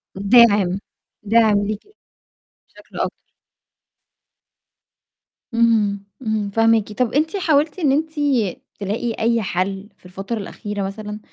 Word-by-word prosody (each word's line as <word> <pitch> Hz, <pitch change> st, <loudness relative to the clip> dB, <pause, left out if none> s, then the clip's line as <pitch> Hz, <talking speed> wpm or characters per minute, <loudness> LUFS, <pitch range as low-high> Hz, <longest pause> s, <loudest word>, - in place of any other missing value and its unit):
دَاعم، 200 Hz, -2 st, +4 dB, 0.4 s
دَاعم 215 Hz, -1 st, +4 dB
ليكِ. 215 Hz, 0 st, -3 dB, 0.9 s
بشكل -, -, -15 dB
أكبر. -, -, -3 dB, 2.3 s
اهم، 220 Hz, -4 st, +2 dB, 0.2 s
إمم، 215 Hz, -4 st, -1 dB
فاهماكِ، 225 Hz, 0 st, +2 dB
طَب 245 Hz, +1 st, -1 dB
أنتِ 320 Hz, +6 st, +1 dB
حاولتِ 315 Hz, -2 st, +1 dB
إن 295 Hz, -6 st, +2 dB
أنتِ 310 Hz, +3 st, 0 dB, 0.7 s
تلاقي 210 Hz, +4 st, -2 dB
أي 230 Hz, +1 st, +2 dB
حَل 195 Hz, +1 st, -2 dB
في -, -, -25 dB
الفترة 195 Hz, +5 st, -5 dB
الأخيرة 205 Hz, 0 st, -5 dB
مثلًا؟ 210 Hz, +2 st, -6 dB
215 Hz, 105 wpm, -20 LUFS, 200-235 Hz, 2.3 s, دَاعم